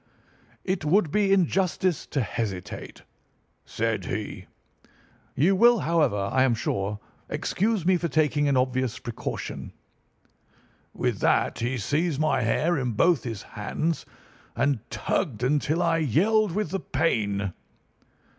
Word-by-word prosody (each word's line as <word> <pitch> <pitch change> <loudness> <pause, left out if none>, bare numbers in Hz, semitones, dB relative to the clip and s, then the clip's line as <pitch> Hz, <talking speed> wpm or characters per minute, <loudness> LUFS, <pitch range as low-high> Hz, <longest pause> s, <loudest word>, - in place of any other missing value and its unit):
"'It 185 -3 -1
would 160 +1 +2
be 205 0 +2
injustice 185 -2 +1
to 140 - -1
hesitate,' 100 -4 -5 0.6
said - - -2
he. - - -5 0.9
'You 175 +9 +3
will, 235 +1 +5
however, 145 -12 +1
I 130 - +3
am 130 -3 +3
sure, 100 -1 -2 0.3
excuse 210 -2 0
me 185 0 +4
for 170 - -2
taking 150 -2 +2
an 140 -2 +2
obvious 130 -1 0
precaution.' 120 -2 -6 1.2
With - - -2
that - - +2
he 125 +3 -1
seized 145 - 0
my 155 -4 +2
hair 155 +8 +1
in 125 -3 -1
both 160 +4 +3
his 115 -5 -5
hands, 155 +10 -3 0.5
and 140 -3 +1
tugged 125 - -2
until 150 +5 +1
I 165 -1 +2
yelled 185 - +2
with 210 -4 -2
the 195 - -1
pain. 100 - -1
150 Hz, 125 wpm, -26 LUFS, 120-175 Hz, 1.2 s, will